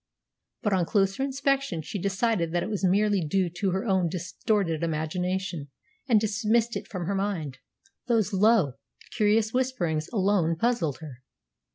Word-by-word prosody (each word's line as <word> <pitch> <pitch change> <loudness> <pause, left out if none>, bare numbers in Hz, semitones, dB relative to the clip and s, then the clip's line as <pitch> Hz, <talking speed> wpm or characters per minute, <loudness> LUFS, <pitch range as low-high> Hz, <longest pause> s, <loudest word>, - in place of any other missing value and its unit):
But 210 -3 +1
on 180 -3 +1
closer 195 +1 +1
inspection 275 - 0
she 200 - -5
decided 195 -3 0
that 175 - +1
it - - -4
was 205 -2 -3
merely 200 0 +3
due 175 +3 0
to 200 - +1
her 190 +5 -1
own 190 -5 +2
distorted 180 0 -1
imagination, 170 +1 -2 0.4
and 225 -3 +6
dismissed 220 +2 +1
it - - -5
from 180 -4 -5
her 200 - -1
mind. 180 -10 -2 0.5
Those 225 -4 +1
low, 190 - +3 0.4
curious 215 0 +2
whisperings 180 -12 -1
alone 195 -6 +2
puzzled 170 - 0
her. 140 -6 -9
195 Hz, 150 wpm, -27 LUFS, 170-220 Hz, 0.5 s, and